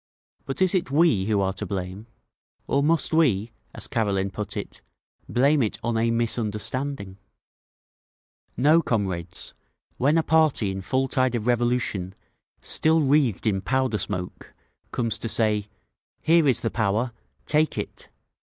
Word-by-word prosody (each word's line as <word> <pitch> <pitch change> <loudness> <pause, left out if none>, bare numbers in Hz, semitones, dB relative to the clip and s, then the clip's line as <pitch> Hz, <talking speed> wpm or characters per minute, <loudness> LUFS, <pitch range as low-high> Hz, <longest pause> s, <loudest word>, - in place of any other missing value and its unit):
But 135 +7 0
is 185 - +3
it 180 -7 0
we 140 - +3
who 105 -1 +1
are 95 0 0
to 95 - -6
blame? 95 +2 -5 0.6
Or 140 - +1
must 160 +2 +1
we, 120 -9 +2 0.2
as - - -6
Karelin 100 -4 0
put 105 +1 -4
it, - - -6 0.5
blame 140 +4 +3
it 110 - -1
on 120 0 -1
a 115 +1 +2
'misunderstanding'? 115 -1 -2 1.4
No, 155 +6 +5
comrades. 95 - -3 0.4
When 145 +5 +3
a 165 - +3
party 155 -12 +3
in 95 0 -5
full 130 +7 0
tide 130 -1 +1
of 110 -2 -3
revolution, 120 -6 0 0.5
still 160 +1 +2
wreathed 140 -7 +2
in 100 -3 +1
powder 130 -1 0
smoke, 90 0 -5 0.4
comes 115 -3 -1
to 115 - -4
say, 105 -2 +1 0.6
'Here 165 -1 +4
is 130 - +3
the 115 - -1
Power—take 120 +7 -1
it! - - -6
115 Hz, 140 wpm, -25 LUFS, 100-140 Hz, 1.4 s, No